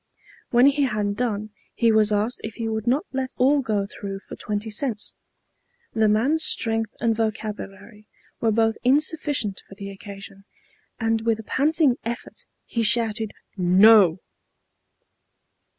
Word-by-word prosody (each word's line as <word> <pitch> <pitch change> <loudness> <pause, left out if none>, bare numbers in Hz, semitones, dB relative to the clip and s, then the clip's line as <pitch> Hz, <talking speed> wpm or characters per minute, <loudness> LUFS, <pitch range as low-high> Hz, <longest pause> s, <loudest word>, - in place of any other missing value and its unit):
When 245 +1 +5
he 280 0 +4
had 210 -4 -1
done 215 -3 -2 0.2
he 230 -2 +3
was 215 -1 +4
asked 210 +4 0
if 220 -1 -6
he 230 - -3
would 220 0 -3
not 265 +5 +2
let 265 -1 -2
all 275 +3 +3
go 210 -6 -1
through 195 -1 -7
for - - -10
twenty 210 +1 -4
cents. 215 -1 -2 0.8
The 220 -1 +3
man's 260 +10 +2
strength 225 -1 0
and 230 -1 +1
vocabulary 215 -1 -5 0.3
were 225 - +1
both 225 0 +2
insufficient 280 -6 +1
for 195 - -12
the 200 0 -7
occasion, 195 0 -11 0.5
and 225 -1 0
with 225 -1 +1
a - - -7
panting 285 +2 +2
effort 235 +1 -6 0.2
he 230 - -2
shouted 225 -1 +1 0.3
"No!" 190 0 +6
225 Hz, 140 wpm, -23 LUFS, 210-240 Hz, 0.8 s, No